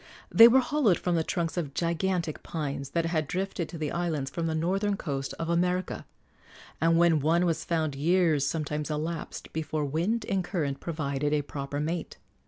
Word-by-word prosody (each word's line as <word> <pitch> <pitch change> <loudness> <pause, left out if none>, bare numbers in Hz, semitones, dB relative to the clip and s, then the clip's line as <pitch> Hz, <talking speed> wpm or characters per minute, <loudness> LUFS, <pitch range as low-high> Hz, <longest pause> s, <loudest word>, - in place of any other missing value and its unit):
They 230 - +10
were 260 +3 +6
hollowed 255 - +2
from 180 - -1
the 165 -1 +2
trunks 170 +1 -2
of 145 -5 -3
gigantic 170 -1 -1
pines 140 -4 -4
that 165 - +2
had 160 -3 0
drifted 185 0 -3
to 170 - -7
the 155 -2 -2
islands 160 -6 -2
from 165 -1 -2
the 160 - -1
northern 195 +5 0
coast 135 -6 -4
of 165 - -3
America, 180 +2 0 0.7
and 165 +1 +4
when 170 -2 +4
one 165 +5 +2
was 165 -2 0
found 160 -3 0
years 160 0 +2
sometimes 150 +1 -2
elapsed 155 +2 -4
before 155 -1 -2
wind 175 +11 -1
and 195 -2 0
current 150 -7 -2
provided 145 -3 -2
a 150 -1 +1
proper 140 0 -5
mate. 160 +3 -3
165 Hz, 180 wpm, -28 LUFS, 150-175 Hz, 0.7 s, They